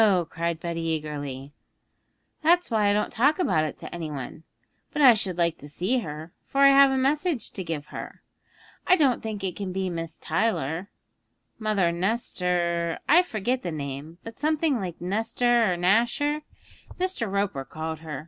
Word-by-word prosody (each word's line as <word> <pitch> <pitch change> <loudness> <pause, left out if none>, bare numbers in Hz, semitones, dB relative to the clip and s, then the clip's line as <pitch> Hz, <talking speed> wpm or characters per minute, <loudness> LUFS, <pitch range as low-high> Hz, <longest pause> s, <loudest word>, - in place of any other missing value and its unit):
cried 170 0 -2
Betty 170 0 -3
eagerly, 145 -4 -4 0.9
'that's 345 -1 +3
why 210 -2 +3
I - - +4
don't 210 0 0
talk 270 +7 +3
about 185 - +2
it 155 - -5
to - - -9
any 165 -2 -4
one; 145 +2 -7 0.5
but - - -4
I 265 -4 +9
should 190 -5 -2
like 170 -2 +1
to 145 - -10
see 190 - 0
her, 160 -4 -7
for 275 - -1
I 275 - +9
have 275 0 +7
a 265 - 0
message 285 - 0
to 190 - -5
give 160 -4 -4
her. - - -8 0.6
I 370 - +7
don't 275 -8 +2
think 215 -3 -5
it 185 -2 -2
can 195 -2 -4
be 190 0 -2
Miss 165 -1 -5
Tyler; 170 -1 -1 0.7
Mother 210 -6 +1
Nestor 175 -3 0
I 335 +4 +7
forget 250 - -2
the 175 - -4
name, 145 +2 -6
but 225 0 -10
something 305 -2 +1
like 180 -4 -5
Nestor 225 +3 +1
or 175 - -1
Nasher 235 - +2 0.6
Mr. 365 - -1
Roper 200 -9 -1
called 160 +3 -5
her. 155 -4 -6
190 Hz, 170 wpm, -26 LUFS, 165-240 Hz, 0.9 s, I